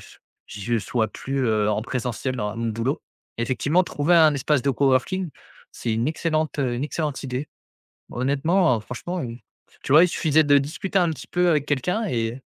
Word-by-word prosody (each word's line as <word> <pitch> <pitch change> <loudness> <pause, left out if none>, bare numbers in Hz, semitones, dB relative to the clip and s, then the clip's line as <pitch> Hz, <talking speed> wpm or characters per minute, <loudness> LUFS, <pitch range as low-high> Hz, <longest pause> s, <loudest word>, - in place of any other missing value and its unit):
ch - - -17 0.3
je 115 +3 -2
sois 110 0 -1
plus, 135 +2 -3
heu, 105 -1 +2
en 105 - 0
présentiel 125 +1 -3
dans 105 0 -3
mon 115 0 -2
boulot. 115 +7 -2 0.4
Effectivement, 140 +9 +1
trouver 160 +2 +1
un 155 -3 +6
espace 140 -1 +1
de 140 - +2
coworking 140 +8 +1 0.4
c'est 115 - -3
une 115 +3 0
excellente, 155 -1 -1
heu, 125 -3 0
une 130 +4 -2
excellente 150 -2 -3
idée. 130 +2 -4 0.6
Honnêtement, 140 +3 +2
heu, - - -5
franchement, 140 +11 -5
heu, 120 -1 -6 0.5
tu - - -4
vois 155 +4 +8
il - - +4
suffisait 160 -2 +2
de 145 -1 +5
discuter 180 +7 -2
un 175 -2 +3
petit 155 - -6
peu 180 0 +2
avec 150 -3 +2
quelqu'un 180 - 0
et 115 - -1
heu, - - -10
140 Hz, 190 wpm, -23 LUFS, 120-160 Hz, 0.6 s, vois